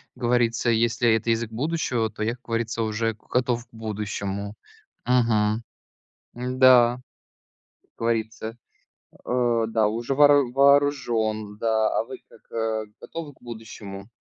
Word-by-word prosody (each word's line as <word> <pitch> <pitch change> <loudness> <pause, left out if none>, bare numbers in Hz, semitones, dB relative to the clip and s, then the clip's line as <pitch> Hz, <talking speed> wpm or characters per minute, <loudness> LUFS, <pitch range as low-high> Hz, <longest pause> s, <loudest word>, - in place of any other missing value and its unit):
говорится. 120 -1 +1
Если 115 0 +2
это 110 +1 -2
язык 115 0 -1
будущего, 125 -3 -1
то 110 - -5
я, 110 - +1
как 125 - -27
говорится, 115 0 -2
уже 110 +1 -1
готов 120 -1 0
к - - -45
будущему. 100 -2 -4 0.5
Мгм. 115 -3 +2 0.7
М-да, 125 -1 +4 0.8
как - - -38
говорится, 115 0 -2 0.7
э, 120 -2 +1
да, 110 -2 +2
уже 115 +5 -2
воору 145 -3 +5
вооружен, 125 -7 +2
да. 110 -1 +1
А - - -2
вы 130 +2 -9
как, 110 -1 -4
готовы 160 -3 -7
к - - -30
будущему? 110 -4 -9
115 Hz, 120 wpm, -24 LUFS, 110-125 Hz, 0.8 s, воору